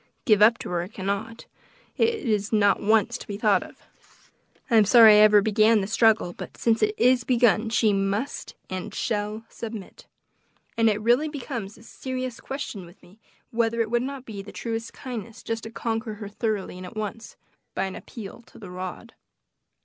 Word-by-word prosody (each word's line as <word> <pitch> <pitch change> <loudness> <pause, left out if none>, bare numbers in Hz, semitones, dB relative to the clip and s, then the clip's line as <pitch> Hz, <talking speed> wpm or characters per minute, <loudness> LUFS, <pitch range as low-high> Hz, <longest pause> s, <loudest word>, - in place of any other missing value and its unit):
give 215 -4 +4
up 230 +2 +6
to - - -7
her 175 -1 -1
I 175 - -5
cannot; 200 +3 -4 0.5
it 460 0 +2
is 210 -3 0
not 205 -2 +3
once 215 -1 +2
to - - -10
be 200 - -5
thought 205 -3 +3
of. - - -13 0.9
I 230 - +5
am 215 - +7
sorry 220 +1 +8
I - - +7
ever 210 -1 +6
began 220 +1 +4
the - - -2
struggle, 220 -4 +2
but - - -9
since 230 -1 +1
it 425 0 +2
is 250 0 +4
begun 235 -3 +3
she 220 -2 +2
must 200 +7 -2
and 185 -1 -6
shall 215 0 -2
submit; 220 -4 -9 0.7
and 230 -1 +4
it - - +3
has 210 - -6
really 245 +7 +3
become 270 -6 -5
a - - -10
serious 255 +3 -6
question 270 -8 -6
with 175 +2 -17
me, 195 +5 -19 0.3
whether 230 0 0
it 225 -1 0
would 240 0 +2
not 265 0 -5
be 205 -3 -7
the 200 - -11
truest 225 -1 -4
kindness 230 -3 -8
just 225 0 -4
to - - -6
conquer 225 -1 -3
her 205 -1 -8
thoroughly 210 -3 -3
and 185 - -8
at 200 - -11
once, 215 +1 -6 0.4
by - - 0
an 190 -1 -4
appeal 225 0 -9
to - - -17
the 195 -5 -10
rod." 185 +5 -7
220 Hz, 195 wpm, -25 LUFS, 205-235 Hz, 0.9 s, sorry